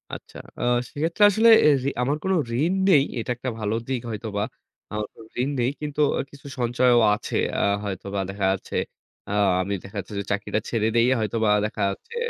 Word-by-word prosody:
আচ্ছা, - - -12 0.2
আ - - -1 0.3
সেক্ষেত্রে 165 +8 0
আসলে 220 +3 +4 0.2
এ - - +8
রি 140 - +1
আমার 140 +4 +1
কোন 190 - 0 0.3
ঋণ 170 +5 +2 0.2
নেই। 145 -6 +6 0.2
এটা 115 - -3
একটা 130 +1 -3
ভালো 105 +1 -1
দিক 130 -3 -2
হয়তোবা। 105 -1 -3 0.5
আমার 105 0 -2
কোন 115 - -13 0.2
ঋণ 135 - 0
নেই। 120 - +2
কিন্তু 150 0 -2 0.2
অ - - -1
কিছু 140 +1 -13
সঞ্চয়ও 120 0 +3
আছে - - -4 0.2
আ - - +1 0.2
হয়তোবা 100 0 -4
দেখা 100 0 -2
যাচ্ছে। 95 - -5 0.5
আ - - -4 0.3
আমি 100 +2 -2
দেখা 100 +2 -12
যাচ্ছে 100 +2 -8
যে 100 - -2
চাকরিটা 105 +1 -1
ছেড়ে 110 -2 +1
দেই 115 +1 +4
হয়তোবা 110 0 0 0.2
দেখা 105 -1 -4
যাচ্ছে 105 - -8
115 Hz, 190 wpm, -24 LUFS, 105-140 Hz, 0.5 s, এ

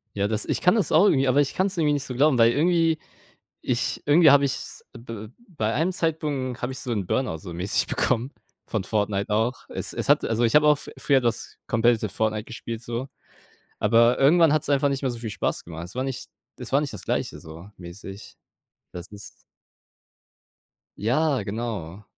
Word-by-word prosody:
Ja, 100 0 0
das 110 0 -2
ich - - -2
kann 180 +4 +4
das 215 - 0
auch 170 +6 +6
irgendwie 135 -8 +3
aber 135 +3 +4
ich 140 - -2
kann's 190 +1 0
irgendwie 155 -4 +2
nicht 145 -2 -1
so 130 - -6
glauben, 140 0 +3
weil 115 0 +5
irgendwie 165 +1 +2 0.6
ich 120 -1 -1
irgendwie 150 +1 +6
habe 140 0 +5
ich's 135 - -5
b 115 -2 -8 0.2
bei 115 - -2
einem 165 +7 +1
Zeitpunkt 150 -7 -2
habe 125 +2 -2
ich 130 - -7
so 125 - -5
'n 100 -4 -1
Burnout 130 -5 -1
so 85 +2 -9
mäßig 90 +4 0
bekommen 125 +3 0 0.3
von 110 -4 -3
Fortnite 105 -1 -1
auch. 110 +4 +1 0.2
Es - - -5
es - - -4
hat - - +4
also, 115 +1 0
ich 115 +2 +2
habe 150 0 +6
auch 150 -1 +5
f - - -6
früher 135 -2 +2
das 120 -2 -3
competitive 115 -2 +2
Fortnite 110 +2 -2
gespielt 115 0 -7
so, 120 +3 -5 0.7
aber 115 +3 +4
irgendwann 160 +2 +5
hat's 155 -1 0
einfach 140 0 +3
nicht 135 -1 -2
mehr 135 -2 -1
so 120 - -7
viel 115 -1 -5
Spaß 100 - -3
gemacht. 85 -1 -7
Es 90 +6 -11
war 130 - -1
nicht 130 -2 -6 0.3
es 125 - -9
war 135 - +4
nicht 145 -4 -4
das 105 - -8
Gleiche - - -2
so 80 +5 -11
mäßig. 95 +3 -11 0.5
Das 90 +1 -8
ist 100 0 -13 1.5
Ja, 135 +4 +1
genau. 105 -3 -5
120 Hz, 200 wpm, -24 LUFS, 105-145 Hz, 1.5 s, auch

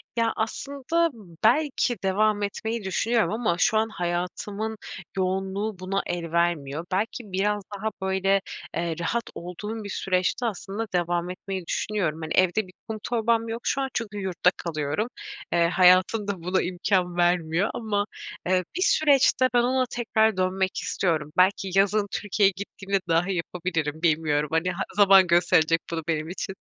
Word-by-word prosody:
Ya 230 -1 +1
aslında 280 +8 -1 0.3
belki 265 -2 +2
devam 205 +2 +2
etmeyi 220 +2 -3
düşünüyorum 220 +5 +1
ama 220 -6 0
şu 215 - +3
an 220 +1 +1
hayatımın 180 +4 -3 0.4
yoğunluğu 190 +2 -1
buna 195 +2 -1
el 170 -2 -4
vermiyor. 170 -2 0
Belki 210 +2 -2
biraz 205 +2 0
daha 215 +2 -2
böyle, 190 +1 +2 0.4
eee, 170 -1 -1
rahat 235 +7 -1
olduğum 210 +6 -6
bir 205 - -7
süreçte 185 +6 0
aslında 210 +1 -3
devam 175 0 0
etmeyi 185 0 -5
düşünüyorum. 170 -4 -1
Hani 155 - -3
evde 185 +2 +2
bir 180 - -16
kum 220 -1 -4
torbam 230 -1 +1
yok 230 +1 -4
şu 275 - 0
an 270 - -1
çünkü 210 -2 -3
yurtta 185 -2 +1
kalıyorum. 155 +5 -2 0.5
Eee, 170 -1 +4
hayatımda 185 +1 +3
buna 185 +1 +1
imkân 180 0 0
vermiyor 175 +1 +2
ama, 205 -3 -1 0.4
eee, 185 0 +2
bir 370 - -2
süreçte 275 -6 +4
ben 240 - +4
ona 255 +1 +2
tekrar 220 -4 +1
dönmek 185 +1 0
istiyorum. 155 -5 -1
Belki 190 +1 +3
yazın 205 +1 +2
Türkiye'ye 200 -1 +2
gittiğimde 195 0 -3
dahi 175 +3 +1
yapabilirim, 165 -3 -3
bilmiyorum 150 -3 +1
hani 165 +3 +1
ha 185 +2 -3
zaman 195 -2 +7
gösterecek 165 -1 +4
bunu 165 -1 -3
benim 160 0 -1
için. 190 +1 -5
190 Hz, 150 wpm, -25 LUFS, 175-220 Hz, 0.5 s, zaman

